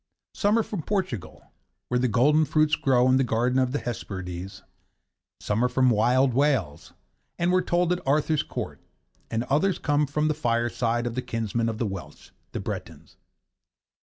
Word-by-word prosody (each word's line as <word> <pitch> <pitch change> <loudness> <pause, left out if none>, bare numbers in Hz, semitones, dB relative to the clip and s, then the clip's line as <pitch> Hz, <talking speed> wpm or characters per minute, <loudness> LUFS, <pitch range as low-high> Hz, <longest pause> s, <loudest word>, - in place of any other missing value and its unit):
Some 210 +1 +2
are 225 - +2
from 205 -6 -5
Portugal, 185 - -4 0.4
where 125 - +1
the 125 - +2
golden 145 +8 +4
fruits 155 +1 +2
grow 125 -2 +3
in 130 0 +4
the 135 - +3
Garden 125 +2 +1
of 130 -1 +1
the 145 - 0
Hesperides; 95 -7 -6
and - - -31 0.7
some 105 +3 -1
are 125 - +2
from 130 0 +3
wild 125 +4 +3
Wales, 130 - 0 0.4
and 175 +1 +1
were 185 0 +3
told 175 0 +1
at 180 - -4
Arthur's 150 +2 +2
Court; - - -6 0.5
and 115 0 -1
others 155 +8 +1
come 145 0 +1
from 150 +2 0
the 155 - +2
firesides 120 -3 0
of 120 - -3
the 130 - -2
kinsmen 115 -1 -2
of 110 - -4
the 115 - -1
Welsh, 95 -3 -8 0.2
the - - -4
Bretons. - - -7
130 Hz, 175 wpm, -26 LUFS, 115-150 Hz, 0.7 s, golden